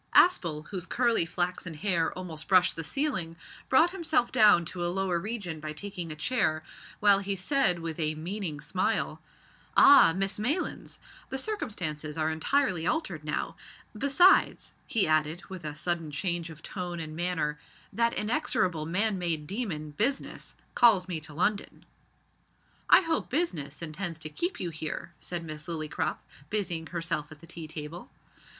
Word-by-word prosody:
Aspel, 160 Hz, -, +4 dB
whose 185 Hz, -3 st, -4 dB
curly 235 Hz, -8 st, +2 dB
flaxen 175 Hz, -1 st, -2 dB
hair 170 Hz, 0 st, +1 dB
almost 160 Hz, -4 st, -6 dB
brushed 185 Hz, -1 st, +4 dB
the 165 Hz, -, -3 dB
ceiling, 190 Hz, -, -1 dB, 0.3 s
brought 320 Hz, +6 st, +5 dB
himself 320 Hz, -9 st, 0 dB
down 205 Hz, -6 st, +6 dB
to 175 Hz, +2 st, -4 dB
a -, -, +1 dB
lower 185 Hz, -1 st, 0 dB
region 195 Hz, -5 st, -4 dB
by 155 Hz, 0 st, -5 dB
taking 180 Hz, -1 st, -5 dB
a -, -, -5 dB
chair, 160 Hz, -3 st, 0 dB, 0.4 s
while 200 Hz, -1 st, +6 dB
he 200 Hz, 0 st, -2 dB
said 195 Hz, 0 st, +2 dB
with 165 Hz, -1 st, -5 dB
a 155 Hz, -1 st, +1 dB
meaning 170 Hz, -1 st, -4 dB
smile -, -, -1 dB, 0.6 s
"Ah! 280 Hz, -11 st, +9 dB
Miss 195 Hz, +3 st, -1 dB
Maylands, 285 Hz, -, -2 dB, 0.3 s
the 265 Hz, -, -3 dB
circumstances 180 Hz, -, -3 dB
are 160 Hz, 0 st, +1 dB
entirely 180 Hz, -, +1 dB
altered 320 Hz, +1 st, -1 dB
now -, -, -3 dB, 0.4 s
besides," 280 Hz, -, +4 dB
he 225 Hz, -, +3 dB
added 155 Hz, +2 st, +1 dB
with 185 Hz, -3 st, -7 dB
a 150 Hz, -1 st, -5 dB
sudden 165 Hz, 0 st, -1 dB
change 170 Hz, +2 st, -1 dB
of 160 Hz, 0 st, -12 dB
tone 180 Hz, -3 st, -5 dB
and 155 Hz, -1 st, -6 dB
manner, 160 Hz, -4 st, -1 dB, 0.3 s
"that 235 Hz, 0 st, +2 dB
inexorable 210 Hz, -, 0 dB
man 200 Hz, +3 st, +1 dB
made 165 Hz, -4 st, -1 dB
demon, 170 Hz, -6 st, -4 dB
Business, 245 Hz, -, -2 dB, 0.2 s
calls 205 Hz, -6 st, +5 dB
me 175 Hz, -3 st, -2 dB
to 155 Hz, -, -10 dB
London." 200 Hz, +7 st, -1 dB, 1.0 s
"I -, -, +8 dB
hope 325 Hz, -3 st, -1 dB
Business 170 Hz, -, -2 dB
intends 165 Hz, +1 st, -3 dB
to 155 Hz, -1 st, -6 dB
keep 345 Hz, -, -3 dB
you 175 Hz, -2 st, -3 dB
here," 155 Hz, +2 st, -5 dB
said 175 Hz, -1 st, -5 dB
Miss 155 Hz, 0 st, -7 dB
Lillycrop, 155 Hz, -3 st, -2 dB, 0.3 s
busying 175 Hz, -6 st, -1 dB
herself 165 Hz, -3 st, -3 dB
at 155 Hz, -, -10 dB
the 165 Hz, -, -15 dB
tea 165 Hz, -1 st, -8 dB
table. 155 Hz, +2 st, -7 dB
175 Hz, 155 wpm, -29 LUFS, 155-210 Hz, 1.0 s, Ah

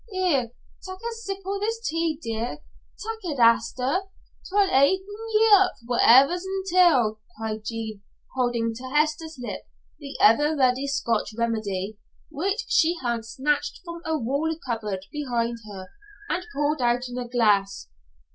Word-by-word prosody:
Here, 355 Hz, -, +1 dB, 0.3 s
tak' 375 Hz, 0 st, -7 dB
a 465 Hz, +4 st, -5 dB
sip 395 Hz, -4 st, -6 dB
o' 395 Hz, +1 st, -2 dB
this, 450 Hz, +3 st, -2 dB, 0.4 s
dear. 230 Hz, +4 st, -3 dB, 0.5 s
Tak' 445 Hz, +1 st, -5 dB
it, 320 Hz, -6 st, -4 dB
Hester; 240 Hz, +6 st, +3 dB, 0.5 s
'twill 400 Hz, +1 st, +3 dB
hairten 370 Hz, +7 st, +3 dB, 0.3 s
ye 445 Hz, +1 st, +5 dB
up 390 Hz, -2 st, +6 dB
for -, -, -20 dB
whatever's 275 Hz, +9 st, +6 dB
intil't," 360 Hz, -, +2 dB, 0.2 s
cried 220 Hz, -1 st, -4 dB
Jean, 220 Hz, -2 st, -5 dB, 0.3 s
holding 240 Hz, -3 st, 0 dB
to 240 Hz, +3 st, -10 dB
Hester's 305 Hz, +2 st, 0 dB
lips 240 Hz, -, -6 dB, 0.3 s
the -, -, -8 dB
ever 295 Hz, +8 st, +5 dB
ready 260 Hz, +1 st, +2 dB
Scotch 230 Hz, -5 st, -1 dB
remedy, 215 Hz, -3 st, -2 dB, 0.3 s
which 390 Hz, +9 st, -1 dB
she 335 Hz, +2 st, +3 dB
had 235 Hz, -2 st, -1 dB
snatched 290 Hz, +5 st, -1 dB
from 340 Hz, -1 st, -7 dB
a 320 Hz, 0 st, -1 dB
wall 280 Hz, +6 st, -1 dB
cupboard 210 Hz, -6 st, -3 dB
behind 240 Hz, -5 st, -2 dB
her 190 Hz, -2 st, -9 dB, 0.4 s
and 355 Hz, 0 st, -2 dB
poured 295 Hz, 0 st, 0 dB
out 245 Hz, +1 st, +1 dB
in 245 Hz, 0 st, -5 dB
a 245 Hz, -, -5 dB
glass. 205 Hz, -, +1 dB
265 Hz, 145 wpm, -25 LUFS, 230-350 Hz, 0.5 s, up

